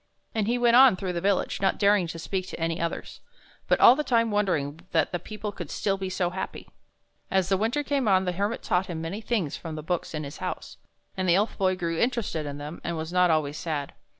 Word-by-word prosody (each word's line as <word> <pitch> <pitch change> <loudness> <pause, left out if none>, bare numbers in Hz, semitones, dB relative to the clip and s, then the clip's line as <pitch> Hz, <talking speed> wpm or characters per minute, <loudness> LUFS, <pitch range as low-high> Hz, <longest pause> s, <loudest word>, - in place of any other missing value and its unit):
And 215 -2 0
he 240 +2 +1
went 240 -1 +4
on 260 -4 +8
through 185 -1 -3
the 170 - -2
village, 195 0 0
not 195 - +2
daring 200 -3 +3
to 165 - -6
speak 185 +2 -3
to - - -7
any 165 +1 -1
others, 170 - -4 0.5
but - - +3
all 245 - +9
the 300 - -1
time 230 -4 +2
wondering 165 -8 0
that 160 -3 +2
the 175 - -2
people 215 +3 -6
could 175 -6 -8
still 195 -2 0
be 190 -1 -4
so 180 -1 -1
happy. 190 +1 -6 0.6
As 190 -1 +1
the 195 - +4
winter 230 +9 0
came 275 -4 0
on, 190 -2 +4
the 180 - 0
Hermit 200 +5 -2
taught 180 +2 +1
him 170 -3 -4
many 165 +7 -4
things 210 -10 -1
from 160 -2 -7
the 155 - -6
books 170 0 -2
in 155 - -3
his 140 0 -8
house, - - -5 0.4
and 185 -1 -1
the 170 - +6
Elf 210 +3 +1
Boy 185 -1 +1
grew 170 -2 -2
interested 230 - -1
in 145 0 -5
them 150 +3 -7
and 170 -1 -3
was 160 +2 -5
not 180 -1 +4
always 150 -2 +1
sad. 150 -4 -3
185 Hz, 240 wpm, -26 LUFS, 165-210 Hz, 0.6 s, all